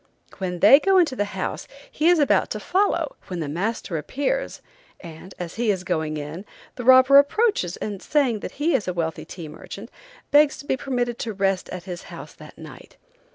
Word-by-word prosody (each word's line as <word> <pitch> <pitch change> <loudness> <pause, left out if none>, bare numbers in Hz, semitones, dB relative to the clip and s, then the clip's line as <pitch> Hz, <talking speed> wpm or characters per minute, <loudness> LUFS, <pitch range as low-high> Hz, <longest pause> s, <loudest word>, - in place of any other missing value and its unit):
When 180 -2 -4
they 275 - +8
go 385 +3 +3
into 330 -7 +3
the 205 - 0
house 185 - -4 0.2
he 315 +3 +2
is 350 - +5
about 290 -2 +2
to - - -4
follow, 405 +6 0
when 180 -3 -5
the 155 - -3
master 175 +1 -3
appears, 290 - -3 0.4
and, 170 +2 -11
as 175 +1 -7
he 235 - +1
is 190 -3 0
going 160 -4 -2
in, 150 +5 -7 0.3
the 245 - -7
robber 260 +2 +7
approaches 285 - +1
and, 205 -2 -5
saying 270 -7 +1
that - - -7
he 305 +3 0
is 225 -8 0
a 180 - -1
wealthy 160 -2 -3
tea 170 -4 -9
merchant, 195 - -10 0.4
begs 295 0 +5
to - - -11
be 265 - 0
permitted 245 -3 -3
to 225 - -4
rest 195 -1 -1
at 180 -1 -7
his 180 -1 -7
house - - -10
that - - -15
night. - - -13
215 Hz, 200 wpm, -23 LUFS, 180-285 Hz, 0.4 s, they